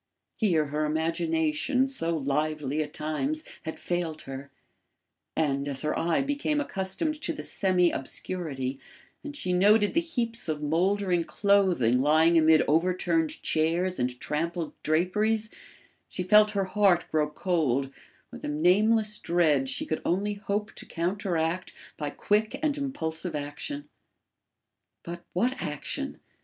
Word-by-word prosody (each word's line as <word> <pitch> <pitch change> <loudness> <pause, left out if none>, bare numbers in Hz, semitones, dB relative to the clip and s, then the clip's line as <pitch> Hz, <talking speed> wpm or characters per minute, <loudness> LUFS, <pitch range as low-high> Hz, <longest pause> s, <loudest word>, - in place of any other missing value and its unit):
Here 170 -9 +2
her 150 +1 -1
imagination, 160 - +1
so 170 -12 -1
lively 150 +1 -1
at 150 - -4
times, 270 - -2 0.2
had 160 - -5
failed 170 -3 -3
her; 135 +1 -7 0.9
and, 140 -2 0
as 140 0 -2
her 150 - 0
eye 170 +9 +1
became 290 +2 0
accustomed 290 - -2
to - - -1
the 315 - -6
semi 180 -3 +2
obscurity, 135 -3 -4 0.4
and 290 0 -7
she 180 -10 -1
noted 205 +3 +4
the 335 - +3
heaps 235 - -3
of 150 -1 -2
mouldering 180 +3 +1
clothing 180 - +3
lying 160 +4 +4
amid 160 -1 +6
overturned 165 0 +1
chairs 170 +4 +1
and 125 0 -1
trampled 165 +2 -2
draperies, 210 +7 +1 0.6
she 180 - -4
felt 210 +3 +6
her 195 - +2
heart 190 -2 +3
grow 150 -1 +2
cold 145 -5 0 0.4
with - - -10
a - - -3
nameless 210 +8 +3
dread 155 -6 +2
she 130 - -2
could 155 - -2
only 200 +4 0
hope 205 +1 -3
to - - -8
counteract 175 -1 -1 0.2
by 150 -1 -3
quick 215 - 0
and 300 -2 +2
impulsive 175 - -3
action. 150 - -5 1.2
But 170 0 -7
what 250 +8 0
action? 150 -1 -4
170 Hz, 135 wpm, -28 LUFS, 155-205 Hz, 1.2 s, amid